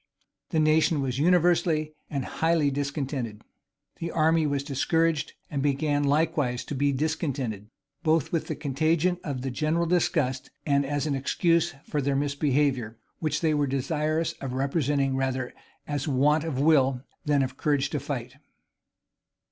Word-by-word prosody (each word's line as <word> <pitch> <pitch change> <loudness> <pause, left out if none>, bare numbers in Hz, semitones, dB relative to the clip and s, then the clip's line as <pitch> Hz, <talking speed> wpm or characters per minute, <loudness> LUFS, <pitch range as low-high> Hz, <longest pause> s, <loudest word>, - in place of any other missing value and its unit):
The 160 - +1
nation 155 0 +3
was 130 -1 -2
universally 165 -2 +3 0.2
and 140 -3 -2
highly 160 -3 +1
discontented. 135 -6 -3 0.6
The 170 - -3
army 160 -1 +2
was 140 -1 -1
discouraged, 160 +2 0
and 140 -2 -3
began 145 +1 +1
likewise 140 -4 +1
to - - -5
be 140 +1 +1
discontented, 135 - -2 0.3
both 160 -3 +2
from 165 - +1
the - - -5
contagion 160 +5 +1
of 135 -4 -3
general 155 +5 +1
disgust, 155 -6 0 0.2
and 140 -1 +2
as 145 +1 -1
an 150 - 0
excuse 165 +4 +1
for 150 - -2
their 140 0 0
misbehavior, 140 -4 0 0.2
which 155 -2 -1
they 160 -2 +2
were 145 -1 +1
desirous 150 +4 -1
of 135 -2 -4
representing 135 0 0
rather 130 -1 -1 0.3
as 145 -1 -2
want 150 +3 +3
of 145 -5 -2
will 135 -4 +3 0.2
than 145 -2 +3
of 130 0 -4
courage 145 -2 +1
to 150 - -1
fight. 130 -2 -5
145 Hz, 145 wpm, -27 LUFS, 135-155 Hz, 0.6 s, nation